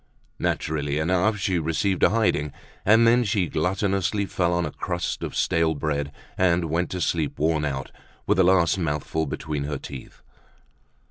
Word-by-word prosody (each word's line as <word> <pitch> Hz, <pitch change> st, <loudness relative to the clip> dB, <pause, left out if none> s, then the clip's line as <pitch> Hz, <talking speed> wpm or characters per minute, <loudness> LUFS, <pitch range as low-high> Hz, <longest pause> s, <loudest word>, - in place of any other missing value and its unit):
Naturally 75 Hz, -2 st, -1 dB
enough 90 Hz, +7 st, +1 dB
she 95 Hz, -3 st, 0 dB
received 85 Hz, +4 st, 0 dB
a -, -, +6 dB
hiding, 100 Hz, -10 st, +1 dB, 0.3 s
and 110 Hz, +3 st, +5 dB
then 120 Hz, +2 st, +5 dB
she 100 Hz, -4 st, +1 dB
gluttonously 95 Hz, +4 st, 0 dB
fell 90 Hz, -2 st, 0 dB
on 85 Hz, 0 st, 0 dB
a -, -, -4 dB
crust -, -, -3 dB
of -, -, -5 dB
stale 80 Hz, -1 st, +1 dB
bread 70 Hz, 0 st, -2 dB, 0.3 s
and 85 Hz, -3 st, +2 dB
went 85 Hz, +2 st, 0 dB
to 90 Hz, -, -4 dB
sleep, 80 Hz, -4 st, -1 dB
worn 80 Hz, 0 st, +1 dB
out, 65 Hz, -3 st, -4 dB, 0.3 s
with -, -, +2 dB
the 95 Hz, -, +5 dB
last 90 Hz, 0 st, +3 dB
mouthful 80 Hz, -1 st, -1 dB
between 75 Hz, 0 st, -3 dB
her 75 Hz, -1 st, -3 dB
teeth. 65 Hz, -1 st, -10 dB
85 Hz, 160 wpm, -24 LUFS, 75-95 Hz, 0.3 s, a